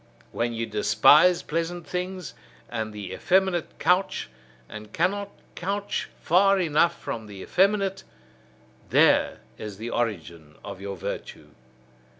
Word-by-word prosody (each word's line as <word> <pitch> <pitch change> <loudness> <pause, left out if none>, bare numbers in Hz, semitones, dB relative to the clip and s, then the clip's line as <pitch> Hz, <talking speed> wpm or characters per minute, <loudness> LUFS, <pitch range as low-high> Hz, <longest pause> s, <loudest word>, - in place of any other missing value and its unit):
When 120 0 -1
ye 115 0 -2
despise 150 +10 +5
pleasant 170 +2 -3
things, 180 +1 -4 0.4
and 110 -2 -3
the 100 -3 -7
effeminate 185 -2 +1
couch, 180 - +1 0.4
and 105 -1 -10
cannot 200 - 0 0.2
couch 200 +3 -3
far 195 +3 +4
enough 170 0 +2
from 110 -2 -5
the 100 -2 -10
effeminate: 195 0 +1 0.9
there - - +4 0.2
is 105 -2 -7
the 115 +3 -5
origin 85 -9 -3
of 95 - -8
your 100 -1 -5
virtue. - - -6
160 Hz, 120 wpm, -25 LUFS, -, 0.9 s, despise